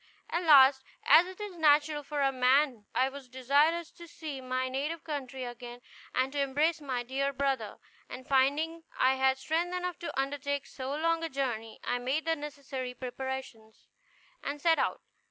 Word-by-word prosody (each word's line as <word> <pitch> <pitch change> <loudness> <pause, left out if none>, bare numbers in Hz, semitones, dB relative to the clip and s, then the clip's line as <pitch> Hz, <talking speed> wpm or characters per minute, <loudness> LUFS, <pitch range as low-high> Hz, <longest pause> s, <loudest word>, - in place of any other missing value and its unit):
At 345 +1 -1
last, 270 -3 +7 0.2
as 320 +5 +7
it 370 +1 -10
is 415 -3 -6
natural 300 -1 +3
for 290 0 -3
a 270 -1 +3
man, 255 -2 +2
I 260 - +3
was 270 -1 -9
desirous 290 +6 +2
to 340 - -13
see 305 -5 -7
my 255 0 -2
native 285 +5 -3
country 265 -4 -5
again, 240 0 -8 0.4
and 260 +1 +1
to 285 - 0
embrace 300 +4 +1
my 255 -4 -2
dear 270 +3 -1
brother; 270 -6 -2 0.3
and 255 0 -9
finding 290 +5 +2 0.2
I 260 +1 +4
had 265 0 +3
strength 335 +5 -1
enough 360 -1 -3
to 335 - -4
undertake 285 0 -2
so 265 -1 -7
long 330 +1 +1
a 330 - -2
journey, 240 -6 -3
I 245 - -1
made 265 +6 -1
the 325 0 +2
necessary 275 -4 -6
preparations, 250 -3 -7 0.5
and 285 +1 -4
set 325 +1 +3
out. - - 0
275 Hz, 170 wpm, -30 LUFS, 260-310 Hz, 0.5 s, last